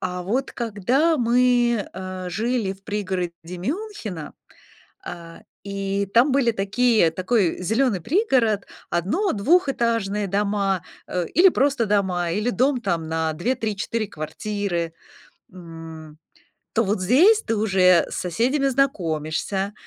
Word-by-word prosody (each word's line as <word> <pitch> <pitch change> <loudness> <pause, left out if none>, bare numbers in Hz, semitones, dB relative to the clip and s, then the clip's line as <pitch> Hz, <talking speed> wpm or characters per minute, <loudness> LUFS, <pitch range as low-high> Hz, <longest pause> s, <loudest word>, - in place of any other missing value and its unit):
А 180 -1 -3
вот 250 +9 -1
когда 245 - +1
мы, 240 -2 +2
э, 185 -1 -6
жили 220 +1 -1
в 195 0 -17
пригороде 190 -5 -2 0.3
Мюнхена, 225 - -5 0.7
а, 165 -1 -9 0.2
и 200 0 -2
там 250 +4 +5
были 260 -3 +3
такие 215 -2 +2
такой 185 +1 0
зелёный 220 0 +1
пригород, 250 - +1 0.3
одно 220 - 0
двухэтажные 230 - +1
дома, 200 -2 0 0.2
э, 180 -1 -2
или 370 +3 +7
просто 270 -5 +1
дома, 190 -4 +1
или 215 +6 0
дом 260 +2 +1
там 170 -8 -2
на 160 0 -1
2-3-4 220 +2 -2
квартиры, 175 0 -3 0.6
м, 165 -3 -11 0.6
то 230 - +2
вот 200 -2 -1
здесь 345 - +5
ты 225 - -1
уже 185 -4 +4
с - - -6
соседями 245 - 0
знакомишься. 195 - -1
205 Hz, 120 wpm, -23 LUFS, 180-245 Hz, 0.7 s, или